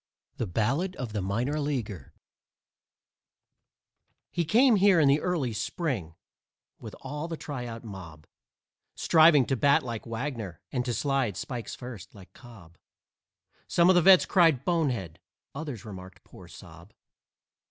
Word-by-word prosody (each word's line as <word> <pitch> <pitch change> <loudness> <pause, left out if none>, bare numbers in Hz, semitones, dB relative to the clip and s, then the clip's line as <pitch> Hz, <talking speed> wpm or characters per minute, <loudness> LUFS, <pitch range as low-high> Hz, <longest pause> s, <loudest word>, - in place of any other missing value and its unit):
THE 115 - -2
BALLAD 135 - -1
OF 120 -4 -6
THE 105 - -2
MINOR 120 +10 -1
LEAGUER 120 - -4 2.2
He 175 - -1
came 235 - +4
here 195 -2 +5
in 150 - +4
the 140 +2 +3
early 155 -10 -1
Spring 105 - -3 0.6
with - - -9
all 150 +4 -5
the 165 -1 -5
tryout 120 -7 -7
mob, 85 -8 -10 0.7
Striving 155 -4 +5
to 135 - 0
bat 140 +5 +3
like 120 -3 -6
Wagner 115 - -5
and 125 -2 -1
to 120 -3 -2
slide 135 - -1
(spikes 120 -3 -6
first) 120 -7 -10
like 95 -2 -15
Cobb. 95 -10 -16 0.9
Some 170 +1 +3
of 185 - +6
the 175 - +5
vets 190 +2 +7
cried, 165 -8 +3
"Bonehead!" 130 - -1 0.3
Others 140 -8 -7
remarked, 95 -3 -11
"Poor - - -15
zob!" - - -14
130 Hz, 135 wpm, -27 LUFS, 105-155 Hz, 2.2 s, vets